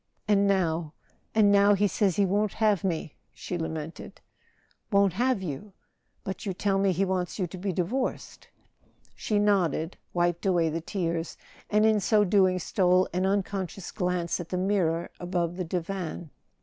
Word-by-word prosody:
"And 200 Hz, -1 st, +3 dB
now—and 185 Hz, +3 st, 0 dB
now—he 205 Hz, 0 st, +5 dB
says 195 Hz, -2 st, +1 dB
he 200 Hz, -, +3 dB
won't 205 Hz, +2 st, 0 dB
have 210 Hz, -5 st, +2 dB
me!" 165 Hz, -5 st, -2 dB, 0.2 s
she 180 Hz, -, -5 dB
lamented. 160 Hz, -1 st, -6 dB, 0.4 s
" -, -, -40 dB
Won't 200 Hz, -2 st, +4 dB
have 240 Hz, 0 st, +1 dB
you? 175 Hz, +5 st, -6 dB, 0.5 s
But 190 Hz, -2 st, -5 dB
you 195 Hz, -3 st, -3 dB
tell 195 Hz, 0 st, +1 dB
me 195 Hz, -1 st, +3 dB
he 190 Hz, +2 st, +1 dB
wants 185 Hz, -2 st, -2 dB
you 190 Hz, -, 0 dB
to 180 Hz, +2 st, -8 dB
be 195 Hz, +1 st, -2 dB
divorced." 190 Hz, +10 st, -3 dB, 0.7 s
She 210 Hz, -, -1 dB
nodded, 190 Hz, -5 st, +1 dB
waped 175 Hz, +1 st, 0 dB
away 170 Hz, -3 st, +2 dB
the 165 Hz, +2 st, -3 dB
tears, 170 Hz, -2 st, -3 dB, 0.3 s
and 210 Hz, +1 st, +3 dB
in 220 Hz, -1 st, +4 dB
so 210 Hz, +2 st, +3 dB
doing 190 Hz, -2 st, +3 dB
stole 185 Hz, +1 st, +2 dB
an 185 Hz, +1 st, +1 dB
unconscious 195 Hz, -2 st, -2 dB
glance 180 Hz, -3 st, -1 dB
at 175 Hz, -, -6 dB
the 180 Hz, -, -2 dB
mirror 180 Hz, -3 st, 0 dB
above 175 Hz, -1 st, -2 dB
the 180 Hz, -1 st, -3 dB
divan. 175 Hz, -2 st, -4 dB
185 Hz, 160 wpm, -27 LUFS, 175-200 Hz, 0.7 s, now—he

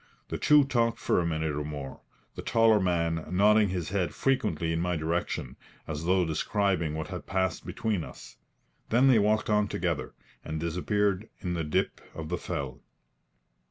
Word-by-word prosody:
The -, -, -3 dB
two 150 Hz, -1 st, +6 dB
talked 120 Hz, -4 st, +1 dB
for -, -, +1 dB
a 85 Hz, -, 0 dB
minute 80 Hz, -2 st, -1 dB
or 75 Hz, -, -2 dB
more, 75 Hz, -2 st, -7 dB, 0.3 s
the -, -, -6 dB
taller 115 Hz, -2 st, +4 dB
man 85 Hz, -3 st, 0 dB
nodding 105 Hz, +3 st, +4 dB
his 90 Hz, -4 st, -3 dB
head 95 Hz, -2 st, -1 dB
frequently 85 Hz, -, 0 dB
in 80 Hz, -, 0 dB
my 90 Hz, 0 st, 0 dB
direction, 80 Hz, +2 st, -2 dB, 0.3 s
as 80 Hz, +1 st, -4 dB
though 90 Hz, 0 st, +3 dB
describing 85 Hz, 0 st, 0 dB
what 80 Hz, 0 st, -4 dB
had 90 Hz, -2 st, -7 dB
passed 95 Hz, -1 st, -1 dB
between 105 Hz, -7 st, -1 dB
us. -, -, -11 dB, 0.5 s
Then 125 Hz, +4 st, +5 dB
they 120 Hz, -4 st, +6 dB
walked 105 Hz, +1 st, +2 dB
on 105 Hz, -1 st, +2 dB
together, -, -, -2 dB, 0.3 s
and 80 Hz, 0 st, -4 dB
disappeared 95 Hz, +5 st, 0 dB
in 90 Hz, -2 st, -2 dB
a 85 Hz, -, -1 dB
dip 75 Hz, -, -1 dB
of 80 Hz, -1 st, -6 dB
the 90 Hz, -, -2 dB
fell. 65 Hz, -3 st, -4 dB
90 Hz, 170 wpm, -28 LUFS, 80-105 Hz, 0.5 s, two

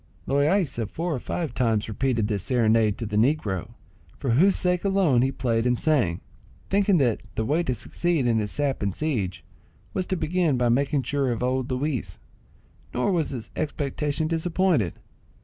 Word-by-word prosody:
Loaysa 140 Hz, -, +1 dB
four 170 Hz, +6 st, -2 dB
or 130 Hz, -, -2 dB
five 155 Hz, +1 st, -3 dB
times 115 Hz, -5 st, +1 dB
repeated 115 Hz, -1 st, 0 dB
this 105 Hz, -3 st, -1 dB
serenade 110 Hz, -1 st, +2 dB
to 115 Hz, -, -4 dB
the 105 Hz, 0 st, -2 dB
negro, 110 Hz, -, 0 dB, 0.4 s
for 135 Hz, -, -1 dB
whose 185 Hz, +11 st, +4 dB
sake 180 Hz, -1 st, 0 dB
alone 190 Hz, -11 st, +3 dB
he 135 Hz, +1 st, +2 dB
played 115 Hz, -2 st, 0 dB
and 125 Hz, -1 st, +1 dB
sang, 125 Hz, -, +1 dB, 0.5 s
thinking 200 Hz, -1 st, +3 dB
that 125 Hz, -7 st, +1 dB
the 110 Hz, -, -1 dB
way 150 Hz, +8 st, +2 dB
to 130 Hz, -7 st, -1 dB
succeed 170 Hz, +1 st, -1 dB
in 115 Hz, -2 st, +2 dB
his 105 Hz, -1 st, -2 dB
sap 140 Hz, +3 st, -1 dB
and 100 Hz, -2 st, -1 dB
siege 115 Hz, -, -2 dB, 0.5 s
was 185 Hz, -, -1 dB
to 190 Hz, -, 0 dB
begin 165 Hz, -3 st, +1 dB
by 120 Hz, -1 st, +2 dB
making 140 Hz, +3 st, +1 dB
sure 135 Hz, +1 st, 0 dB
of 120 Hz, 0 st, -2 dB
old 130 Hz, +1 st, 0 dB
Luis; 130 Hz, 0 st, -2 dB, 0.8 s
nor 125 Hz, +11 st, +1 dB
was 165 Hz, -5 st, +1 dB
his 120 Hz, -4 st, -6 dB
expectation 150 Hz, +1 st, -2 dB
disappointed. 165 Hz, -, +1 dB
135 Hz, 170 wpm, -25 LUFS, 115-160 Hz, 0.8 s, whose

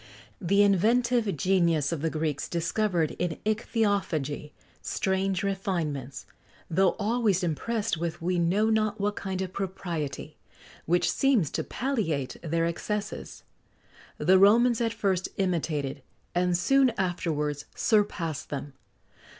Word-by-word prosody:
The 200 Hz, +4 st, +4 dB
inventive 220 Hz, +1 st, +2 dB
genius 170 Hz, -4 st, +2 dB
of 165 Hz, -4 st, -3 dB
the 160 Hz, -, +1 dB
Greeks 155 Hz, -2 st, -2 dB
discovered 170 Hz, -1 st, 0 dB
in 175 Hz, -2 st, -1 dB
ichthyophagy 200 Hz, -, -1 dB, 0.3 s
strange 190 Hz, -1 st, -1 dB
refinements, 165 Hz, -9 st, -3 dB, 0.5 s
though 185 Hz, +2 st, +3 dB
always 210 Hz, -3 st, +1 dB
impressed 210 Hz, +5 st, -1 dB
with 170 Hz, 0 st, -3 dB
we 180 Hz, +1 st, 0 dB
know 200 Hz, +6 st, +2 dB
not 215 Hz, 0 st, +1 dB
what 205 Hz, +1 st, 0 dB
kind 190 Hz, -1 st, -3 dB
of 185 Hz, -1 st, -6 dB
propriety, 175 Hz, -6 st, -4 dB, 0.5 s
which 175 Hz, +2 st, +2 dB
seems 245 Hz, -, +2 dB
to -, -, -2 dB
palliate 200 Hz, -, -2 dB
their 165 Hz, 0 st, 0 dB
excesses. 205 Hz, +5 st, -4 dB, 0.7 s
The 190 Hz, +1 st, +4 dB
Romans 235 Hz, +4 st, +5 dB
at 230 Hz, -1 st, +1 dB
first 195 Hz, -4 st, -1 dB
imitated, 155 Hz, -7 st, -1 dB, 0.3 s
and 180 Hz, 0 st, +2 dB
soon 270 Hz, +9 st, +4 dB
afterwards 155 Hz, -6 st, -1 dB
surpassed 195 Hz, -, 0 dB
them. 140 Hz, 0 st, -5 dB
185 Hz, 120 wpm, -27 LUFS, 165-210 Hz, 0.7 s, Romans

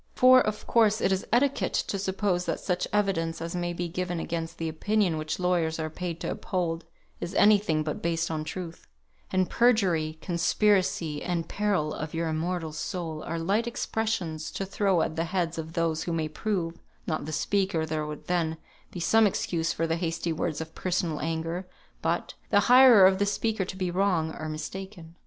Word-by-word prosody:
For, 255 Hz, 0 st, +7 dB
of 215 Hz, -2 st, -2 dB
course, 220 Hz, -2 st, +3 dB
it 190 Hz, -, +1 dB
is 190 Hz, 0 st, -1 dB
etiquette 265 Hz, +4 st, +2 dB
to 195 Hz, -, -1 dB
suppose 190 Hz, -2 st, 0 dB
that -, -, -1 dB
such 180 Hz, -2 st, -1 dB
evidence 185 Hz, -6 st, 0 dB
as 165 Hz, +1 st, -4 dB
may 175 Hz, 0 st, -1 dB
be 175 Hz, 0 st, -3 dB
given 180 Hz, 0 st, -3 dB
against 165 Hz, 0 st, -4 dB
the 165 Hz, -, -2 dB
opinion 185 Hz, +3 st, +1 dB
which 155 Hz, 0 st, -3 dB
lawyers 175 Hz, -3 st, +1 dB
are 155 Hz, 0 st, -3 dB
paid 170 Hz, 0 st, -4 dB
to -, -, -2 dB
uphold, 170 Hz, -3 st, -2 dB, 0.3 s
is 175 Hz, -, -5 dB
any 210 Hz, 0 st, +6 dB
thing 160 Hz, -6 st, 0 dB
but 150 Hz, -1 st, -4 dB
based 165 Hz, 0 st, 0 dB
on 155 Hz, -1 st, -2 dB
truth; 165 Hz, +1 st, -7 dB, 0.4 s
and 185 Hz, -1 st, +2 dB
"perjury," 180 Hz, -10 st, +2 dB
"conspiracy," 175 Hz, -2 st, +1 dB
and 170 Hz, -2 st, -2 dB
"peril 200 Hz, -7 st, 0 dB
of 155 Hz, +1 st, -5 dB
your 165 Hz, 0 st, -1 dB
immortal 165 Hz, +1 st, -2 dB
soul," 160 Hz, -1 st, -4 dB
are 165 Hz, -, -3 dB
light 200 Hz, +8 st, 0 dB
expressions 215 Hz, -9 st, -2 dB
to 195 Hz, -, -3 dB
throw 195 Hz, -2 st, +1 dB
at 160 Hz, -, -3 dB
the 165 Hz, +1 st, 0 dB
heads 170 Hz, -2 st, -1 dB
of 160 Hz, 0 st, -6 dB
those 165 Hz, -2 st, 0 dB
who 170 Hz, -, -2 dB
may 160 Hz, -1 st, 0 dB
prove 170 Hz, 0 st, -3 dB, 0.3 s
(not 155 Hz, -3 st, -2 dB
the 155 Hz, -, -5 dB
speaker, 190 Hz, +1 st, 0 dB
there 155 Hz, -1 st, -2 dB
would 150 Hz, -1 st, -7 dB
then 165 Hz, -3 st, 0 dB, 0.3 s
be 180 Hz, -, -7 dB
some 220 Hz, +6 st, +4 dB
excuse 165 Hz, -3 st, -1 dB
for 165 Hz, -, -1 dB
the 165 Hz, 0 st, 0 dB
hasty 165 Hz, -1 st, -2 dB
words 155 Hz, -1 st, -2 dB
of 160 Hz, 0 st, -6 dB
personal 175 Hz, -4 st, -1 dB
anger, 165 Hz, +3 st, -3 dB, 0.3 s
but) -, -, -1 dB, 0.2 s
the 205 Hz, -, +5 dB
hirer 245 Hz, -5 st, +8 dB
of 190 Hz, 0 st, +4 dB
the 205 Hz, -, +3 dB
speaker 215 Hz, 0 st, 0 dB
to 185 Hz, -, -6 dB
be 185 Hz, -2 st, -1 dB
wrong, 175 Hz, -4 st, +1 dB
or 155 Hz, -, -5 dB
mistaken. 170 Hz, +2 st, -7 dB
175 Hz, 190 wpm, -27 LUFS, 160-195 Hz, 0.4 s, hirer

